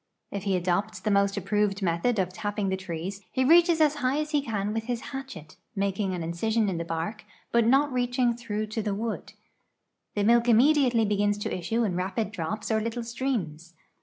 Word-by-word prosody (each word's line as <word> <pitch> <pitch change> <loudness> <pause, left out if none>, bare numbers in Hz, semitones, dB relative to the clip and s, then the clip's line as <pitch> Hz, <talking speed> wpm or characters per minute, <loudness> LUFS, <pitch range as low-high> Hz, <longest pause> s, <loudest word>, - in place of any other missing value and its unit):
" - - -55
If 200 0 -5
he 195 -2 +2
adopts 185 +3 -1
the 210 +3 -1
most 200 0 +2
approved 205 0 0
method 175 +7 +1
of 185 -2 0
tapping 205 0 -2
the 190 - 0
trees, 185 +1 -5
he 260 - +1
reaches 340 +2 +6
as 305 -2 +4
high 265 0 +1
as 305 0 -2
he 295 -2 +2
can 210 -5 -2
with 225 0 -2
his 245 -1 -2
hatchet, 265 - -8 0.2
making 195 -1 -1
an 175 - -4
incision 215 +6 0
in 175 -3 -2
the - - -2
bark, 165 +6 -4 0.3
but 235 -1 +3
not 275 +3 +3
reaching 245 -1 +1
through 215 -3 -3
to 225 - -1
the 205 -2 -2
wood. 225 +1 -4 0.8
The 205 - +1
milk 235 +2 +4
immediately 250 -1 +4
begins 205 0 +1
to 205 - -3
issue 225 +7 -1
in 195 -5 -1
rapid 190 +4 -2
drops 185 +4 -4
or 220 0 +2
little 230 +2 -3
streams. 210 - -3
210 Hz, 200 wpm, -27 LUFS, 190-240 Hz, 0.8 s, reaches